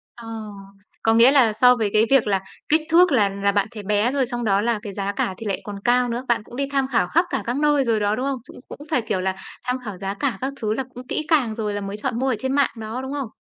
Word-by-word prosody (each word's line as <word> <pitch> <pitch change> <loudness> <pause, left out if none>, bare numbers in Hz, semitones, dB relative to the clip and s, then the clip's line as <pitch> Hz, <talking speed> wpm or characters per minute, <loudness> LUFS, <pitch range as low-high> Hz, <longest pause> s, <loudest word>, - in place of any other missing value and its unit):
Ờ, 235 -1 -11 0.8
có 225 - +4
nghĩa 230 +3 +7
là 255 -6 +4
so 250 +3 +5
với 220 -4 0
cái 215 +1 +5
việc 270 -5 +5
là 195 -2 +2 0.3
kích 310 +1 +4
thước 350 +1 +5
là 215 -7 +3
là 200 +1 0
bạn 200 0 +1
thấy 215 -3 -8
bé 210 +4 +1
rồi 275 -1 +1
xong 240 0 -4
đó 200 -2 +2
là 230 0 0
cái 205 -3 -7
giá 200 0 -2
cả 195 -1 -1
thì 225 - -8
lại 200 -2 -2
còn 205 -1 -7
cao 245 0 +3
nữa. 240 +2 -3
Bạn 235 -2 +1
cũng 240 - -13
đi 275 +2 -1
tham 275 -2 +1
khảo 230 -8 +1
khắp 335 - +2
cả - - -1
các 240 +3 -2
nơi 295 -1 +3
rồi 230 -3 +1
đó, 205 0 +1
đúng 255 - -3
không? 275 -2 -2
Dũng - - -12
cũng - - -10
phải, 300 - +2
kiểu 215 -4 -2
là, 190 0 -1 0.3
tham 250 +1 -1
khảo 205 -4 -6
giá 195 +1 -3
cả 250 +4 -2
các 265 +2 -2
thứ 215 -1 0
là 265 - -2
cũng 250 +1 -9
kỹ 310 - -2
càng 270 -9 +2
rồi 215 -2 -2
là 205 - -3
mới 200 +1 -5
chọn 225 +2 -2
mua 265 - 0
ở 255 - +1
trên 265 0 -2
mạng 280 -1 +3
đó, 220 +3 -5
đúng 265 +1 -5
không? 275 -5 -3
235 Hz, 300 wpm, -22 LUFS, 210-265 Hz, 0.8 s, nghĩa